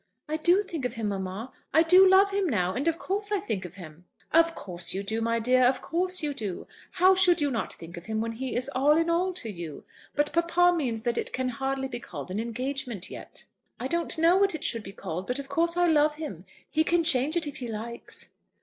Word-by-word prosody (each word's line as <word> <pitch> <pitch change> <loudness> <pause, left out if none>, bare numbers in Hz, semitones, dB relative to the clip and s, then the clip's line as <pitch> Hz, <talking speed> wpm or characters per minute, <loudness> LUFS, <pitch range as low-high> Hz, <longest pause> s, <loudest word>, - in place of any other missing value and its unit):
"I 310 +1 -1
do 350 +5 +3
think 330 -8 -6
of 250 - -2
him, 220 -2 -2
mamma. 195 +5 -5 0.2
I 320 - +7
do 365 +3 +7
love 390 +1 +5
him 395 -3 0
now, 185 -7 0
and 275 +9 -2
of 330 0 +1
course 405 +3 -3
I 410 - +2
think 205 - -3
of 180 0 -10
him." 170 -2 -12 0.3
"Of 330 +1 +4
course 175 -1 -5
you 195 - -2
do, 220 +3 -2
my 230 0 +1
dear; 250 +3 +3
of 255 +1 +3
course 365 +1 0
you 295 -1 -1
do. 210 -9 -5 0.3
How 370 +2 +5
should 360 -2 +4
you 290 -2 +1
not 230 - -2
think 165 +1 -10
of 170 - -9
him 220 0 -2
when 225 +1 -2
he 245 +2 -4
is 250 +2 0
all 290 +4 +4
in 330 +1 +1
all 360 +2 +1
to 245 -11 -4
you? 170 -6 -8 0.3
But 295 0 0
papa 345 +1 +3
means 245 -9 -2
that 235 0 -1
it - - -3
can 255 0 -1
hardly 270 +2 -2
be 240 -2 -5
called 160 - -8
an 195 - -2
engagement 240 -2 -4
yet." - - -9 0.4
"I 255 - -2
don't 340 +3 -1
know 335 +3 +5
what 390 -3 +3
it 305 - -6
should 230 - 0
be 195 - -9
called; 185 -1 -6
but 250 - -1
of 280 -1 -7
course 335 +1 +1
I 355 - +4
love 300 -2 +3
him. 310 0 -7 0.2
He 315 0 +1
can 340 +1 +2
change 305 +1 +4
it 330 - 0
if 290 - -6
he 250 - -5
likes." 230 +1 -7
270 Hz, 245 wpm, -27 LUFS, 225-335 Hz, 0.4 s, I